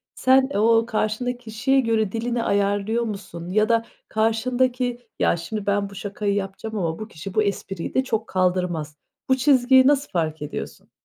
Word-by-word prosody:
Sen, 265 Hz, +1 st, +4 dB
ooo, 225 Hz, +2 st, +4 dB
karşındaki 230 Hz, +2 st, -1 dB
kişiye 245 Hz, +3 st, 0 dB
göre 225 Hz, -5 st, +1 dB
dilini 235 Hz, +1 st, -2 dB
ayarlıyor 205 Hz, +3 st, +1 dB
musun 185 Hz, -6 st, -6 dB
ya 215 Hz, +4 st, +2 dB
da 230 Hz, 0 st, +2 dB, 0.2 s
karşındaki, 245 Hz, +3 st, 0 dB, 0.2 s
"Ya, -, -, +2 dB
şimdi 210 Hz, +4 st, -5 dB
ben 200 Hz, 0 st, 0 dB
bu 200 Hz, -, -13 dB
şakayı 200 Hz, +1 st, -2 dB
yapacağım 205 Hz, +2 st, -4 dB
ama 165 Hz, -4 st, -2 dB
bu 215 Hz, -, -6 dB
kişi 185 Hz, 0 st, -9 dB
bu 215 Hz, -, +3 dB
espriyi 195 Hz, -3 st, -3 dB
de 260 Hz, -, +2 dB
çok 225 Hz, -4 st, -2 dB
kaldırmaz." 180 Hz, -5 st, -1 dB, 0.3 s
Bu 260 Hz, -, +4 dB
çizgiyi 260 Hz, -1 st, +5 dB
nasıl 285 Hz, -1 st, +2 dB
fark 160 Hz, -4 st, -1 dB
ediyorsun? 150 Hz, -, -7 dB
220 Hz, 165 wpm, -23 LUFS, 195-245 Hz, 0.3 s, çizgiyi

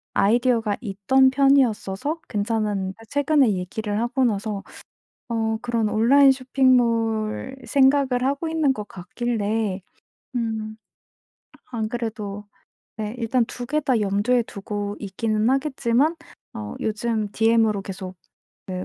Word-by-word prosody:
아이디어가 230 Hz, -1 st, +2 dB
있던 255 Hz, +6 st, +3 dB
편이었어서 275 Hz, 0 st, +2 dB
괜찮았는데 205 Hz, -3 st, -1 dB
최근에 285 Hz, -4 st, +3 dB
얘기를 205 Hz, +3 st, -3 dB
하고 240 Hz, +3 st, 0 dB
나서 205 Hz, -2 st, -2 dB, 0.7 s
어 225 Hz, -1 st, 0 dB
그런 235 Hz, -3 st, 0 dB
온라인 270 Hz, +6 st, +5 dB
쇼핑몰 245 Hz, -3 st, +1 dB
생각을 270 Hz, -2 st, +3 dB
하고 280 Hz, +4 st, -1 dB
있는 310 Hz, -4 st, +2 dB
것 210 Hz, -2 st, -7 dB
같길래 210 Hz, +1 st, -2 dB, 0.6 s
음 220 Hz, -2 st, -3 dB, 1.0 s
안 220 Hz, -2 st, -2 dB
그래도 215 Hz, -3 st, -5 dB, 0.5 s
네 215 Hz, +1 st, -4 dB
일단 230 Hz, 0 st, +1 dB
2 245 Hz, -, -6 dB
개 305 Hz, +4 st, 0 dB
다 260 Hz, -6 st, +1 dB
염두에 205 Hz, +5 st, +2 dB
두고 205 Hz, -1 st, -5 dB
있기는 215 Hz, +2 st, -1 dB
하겠지만 270 Hz, +1 st, +1 dB, 0.4 s
어 105 Hz, -1 st, -6 dB
요즘 215 Hz, 0 st, -1 dB
DM으로 225 Hz, -2 st, +3 dB
계속 190 Hz, -1 st, -7 dB, 0.5 s
네 185 Hz, -1 st, -4 dB
225 Hz, 250 characters per minute, -23 LUFS, 210-255 Hz, 1.0 s, 온라인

